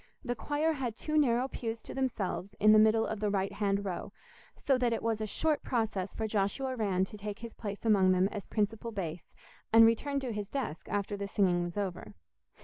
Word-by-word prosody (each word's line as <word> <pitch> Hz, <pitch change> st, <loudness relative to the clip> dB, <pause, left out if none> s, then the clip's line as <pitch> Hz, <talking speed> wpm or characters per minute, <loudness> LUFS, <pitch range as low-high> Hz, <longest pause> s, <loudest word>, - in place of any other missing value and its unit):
The 245 Hz, -, 0 dB
choir 295 Hz, +6 st, 0 dB
had 250 Hz, -6 st, -3 dB
two 305 Hz, -, -3 dB
narrow 255 Hz, -4 st, +3 dB
pews 230 Hz, -3 st, -5 dB
to -, -, -8 dB
themselves 205 Hz, -7 st, -2 dB
in 215 Hz, +1 st, +6 dB
the 215 Hz, -, +7 dB
middle 220 Hz, +1 st, +4 dB
of 220 Hz, -, -3 dB
the 210 Hz, 0 st, 0 dB
right 195 Hz, -1 st, 0 dB
hand 200 Hz, -1 st, 0 dB
row, 185 Hz, -3 st, -4 dB, 0.4 s
so 275 Hz, -, +1 dB
that 245 Hz, -2 st, +2 dB
it -, -, -3 dB
was 225 Hz, -1 st, 0 dB
a 215 Hz, -, -1 dB
short 310 Hz, +8 st, 0 dB
process 220 Hz, -6 st, -1 dB
for 220 Hz, -, -2 dB
Joshua 220 Hz, +6 st, -1 dB
Rann 195 Hz, -5 st, +1 dB
to 210 Hz, +2 st, -11 dB
take 205 Hz, 0 st, -5 dB
his 230 Hz, -1 st, -8 dB
place 205 Hz, 0 st, -6 dB
among 195 Hz, -4 st, +5 dB
them 185 Hz, +1 st, +3 dB
as 205 Hz, -3 st, -6 dB
principal 220 Hz, +2 st, -1 dB
bass, 175 Hz, -5 st, -5 dB, 0.4 s
and 225 Hz, 0 st, +8 dB
return 275 Hz, +5 st, +2 dB
to 250 Hz, -3 st, -3 dB
his 210 Hz, -1 st, -4 dB
desk 225 Hz, -, -4 dB
after 205 Hz, 0 st, -1 dB
the 200 Hz, 0 st, -4 dB
singing 185 Hz, -4 st, +2 dB
was 175 Hz, +2 st, -5 dB
over. 185 Hz, -, -4 dB
215 Hz, 215 wpm, -31 LUFS, 200-235 Hz, 0.4 s, and